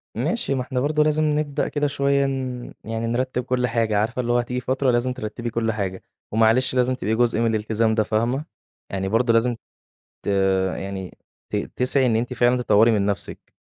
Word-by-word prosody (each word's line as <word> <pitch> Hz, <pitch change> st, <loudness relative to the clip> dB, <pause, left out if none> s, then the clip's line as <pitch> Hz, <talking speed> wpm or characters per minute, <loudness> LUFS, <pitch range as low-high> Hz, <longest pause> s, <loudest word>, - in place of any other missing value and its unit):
ماشي، 140 Hz, -, -1 dB
ما 130 Hz, -, -1 dB
إحنا 125 Hz, 0 st, -3 dB
برضو 150 Hz, +3 st, +1 dB
لازم 155 Hz, 0 st, +2 dB
نبدأ 150 Hz, -1 st, 0 dB
كده 145 Hz, 0 st, 0 dB
شوية 140 Hz, 0 st, +1 dB
ن 130 Hz, -2 st, -4 dB
يعني 115 Hz, +1 st, -3 dB
نرتب 125 Hz, +1 st, -1 dB
كل 125 Hz, 0 st, 0 dB
حاجة 115 Hz, -3 st, +1 dB
عارفة، 115 Hz, +4 st, 0 dB
اللي 120 Hz, 0 st, -1 dB
هو 120 Hz, -, +3 dB
هتيجي 125 Hz, +1 st, -2 dB
فترة 130 Hz, +1 st, +1 dB
لازم 125 Hz, +1 st, +1 dB
ترتبي 120 Hz, +1 st, -5 dB
كل 115 Hz, 0 st, 0 dB
حاجة، 95 Hz, -3 st, -4 dB, 0.3 s
ومعلش 115 Hz, +4 st, +3 dB
لازم 125 Hz, 0 st, +2 dB
تبقي 110 Hz, -1 st, -1 dB
جزء 120 Hz, -1 st, +2 dB
من 115 Hz, -, +2 dB
الالتزام 110 Hz, +1 st, +1 dB
ده 110 Hz, -, +3 dB
فاهمة؟ 120 Hz, +7 st, 0 dB, 0.4 s
يعني 95 Hz, 0 st, -2 dB
برضو 115 Hz, +2 st, +2 dB
لازم 120 Hz, +1 st, +2 dB, 0.7 s
ت -, -, -7 dB, 0.5 s
يعني 95 Hz, -1 st, -6 dB, 0.3 s
ت -, -, -3 dB, 0.2 s
تسعي 130 Hz, +1 st, +2 dB
إن 115 Hz, -3 st, +2 dB
أنتِ 120 Hz, +3 st, -1 dB
فعلًا 120 Hz, +1 st, +3 dB
تطوري 115 Hz, -1 st, +4 dB
من 100 Hz, -2 st, +1 dB
نفسِك. 100 Hz, -1 st, -4 dB
120 Hz, 190 wpm, -23 LUFS, 110-130 Hz, 0.7 s, تطوري